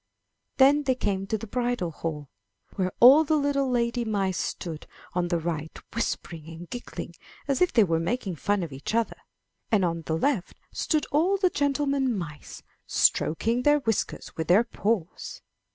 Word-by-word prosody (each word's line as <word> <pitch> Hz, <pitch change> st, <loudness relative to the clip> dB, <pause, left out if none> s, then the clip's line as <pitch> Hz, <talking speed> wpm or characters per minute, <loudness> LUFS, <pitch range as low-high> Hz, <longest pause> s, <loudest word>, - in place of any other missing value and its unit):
Then 280 Hz, +2 st, +6 dB
they 265 Hz, -3 st, +1 dB
came 195 Hz, -5 st, -2 dB
to 220 Hz, -, 0 dB
the 215 Hz, -, -7 dB
bridal 240 Hz, -6 st, -1 dB
hall, 150 Hz, -2 st, -5 dB, 0.5 s
where 185 Hz, -2 st, 0 dB
all 270 Hz, +6 st, +9 dB
the 315 Hz, 0 st, +1 dB
little 280 Hz, -2 st, +1 dB
lady 240 Hz, -1 st, 0 dB
mice 195 Hz, -5 st, -1 dB
stood 160 Hz, -3 st, -5 dB, 0.3 s
on 175 Hz, 0 st, 0 dB
the 175 Hz, -1 st, +1 dB
right 160 Hz, -2 st, -4 dB, 0.2 s
whispering 170 Hz, -7 st, -3 dB
and 165 Hz, +2 st, -9 dB
giggling, 245 Hz, +5 st, -7 dB, 0.3 s
as 275 Hz, +2 st, 0 dB
if 360 Hz, -, +4 dB
they 225 Hz, -, +5 dB
were 165 Hz, -4 st, +1 dB
making 185 Hz, +1 st, -2 dB
fun 205 Hz, +3 st, 0 dB
of 160 Hz, -5 st, -6 dB
each 140 Hz, +11 st, -4 dB
other, 230 Hz, -1 st, 0 dB, 0.5 s
and 205 Hz, -4 st, +3 dB
on 170 Hz, -1 st, -1 dB
the 160 Hz, -, 0 dB
left 230 Hz, -, -1 dB
stood 310 Hz, -3 st, 0 dB
all 345 Hz, +7 st, +3 dB
the 370 Hz, -2 st, +2 dB
gentlemen 275 Hz, -3 st, +1 dB
mice 150 Hz, -5 st, -8 dB, 0.2 s
stroking 230 Hz, +10 st, +2 dB
their 295 Hz, +3 st, +4 dB
whiskers 225 Hz, -7 st, -2 dB
with 160 Hz, -1 st, -3 dB
their 190 Hz, +6 st, +5 dB
paws. 210 Hz, -6 st, -3 dB
220 Hz, 170 wpm, -26 LUFS, 170-265 Hz, 0.5 s, all